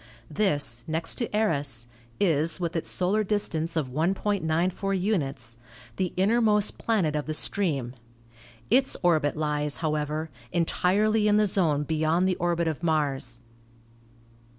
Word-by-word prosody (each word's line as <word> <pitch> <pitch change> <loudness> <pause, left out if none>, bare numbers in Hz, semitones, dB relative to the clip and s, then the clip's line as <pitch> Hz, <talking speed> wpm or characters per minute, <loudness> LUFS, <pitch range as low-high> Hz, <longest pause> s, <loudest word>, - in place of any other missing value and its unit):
This, 145 - +1
next 160 +1 -2
to 235 - -1
Eros, 140 - +1 0.3
is, 165 -3 +1
with 170 -1 -3
its 165 - -2
solar 195 +4 0
distance 170 -6 -2
of 145 -6 -1
1.94 185 +3 0
units, 135 - -2 0.4
the 185 -2 -1
innermost 210 +1 +2
planet 190 -10 0
of 150 0 -2
the 155 - 0
stream. 145 -11 -1 0.8
Its 265 0 +3
orbit 155 -4 +2
lies, 150 -1 -1
how 155 -2 -1
ever, 155 +1 -3 0.2
entirely 210 +5 +2
in 210 0 +4
the 210 - +4
zone 165 -7 +2
beyond 160 +4 +1
the 185 - +1
orbit 170 -1 0
of 160 -1 -3
Mars. 140 -7 -1
165 Hz, 130 wpm, -26 LUFS, 150-195 Hz, 0.8 s, in